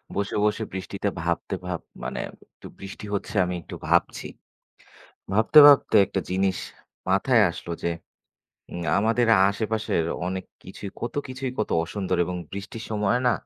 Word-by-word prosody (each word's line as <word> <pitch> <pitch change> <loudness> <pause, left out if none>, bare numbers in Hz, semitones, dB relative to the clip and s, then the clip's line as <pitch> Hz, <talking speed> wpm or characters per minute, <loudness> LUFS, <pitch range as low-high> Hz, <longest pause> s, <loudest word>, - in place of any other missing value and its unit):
বসে, 100 +1 -2
বসে 105 +1 0
বৃষ্টিতে 95 +1 -3
ভাবতে 85 +3 -2
ভাব 90 -2 -2 0.2
মানে 65 - -4 0.3
একটু - - -13
বৃষ্টি 95 +2 -8
হচ্ছে, 100 +1 -3
আমি 90 - -3
একটু - - -9
ভাবছি। - - +1 1.1
ভাবতে, 110 +9 +6
ভাবতে 140 -5 +5
একটা 100 0 -2
জিনিস 95 -1 +1 0.5
মাথায় 110 +4 +4
আসলো, 85 - -8
যে - - +1 0.8
উম 85 - -5 0.2
আমাদের 115 +3 +2 0.2
আশেপাশের 110 -4 -1 0.2
অনেক 95 0 -3 0.2
কিছুই 95 +1 -8
কত 120 - -3
কিছুই 130 0 -4
কত 110 - -1
অসুন্দর, 95 +1 -2
এবং 90 +1 -3 0.2
বৃষ্টির 105 +3 -7
সময় 105 +2 +1
না, - - +4
100 Hz, 145 wpm, -25 LUFS, 95-110 Hz, 1.1 s, ভাবতে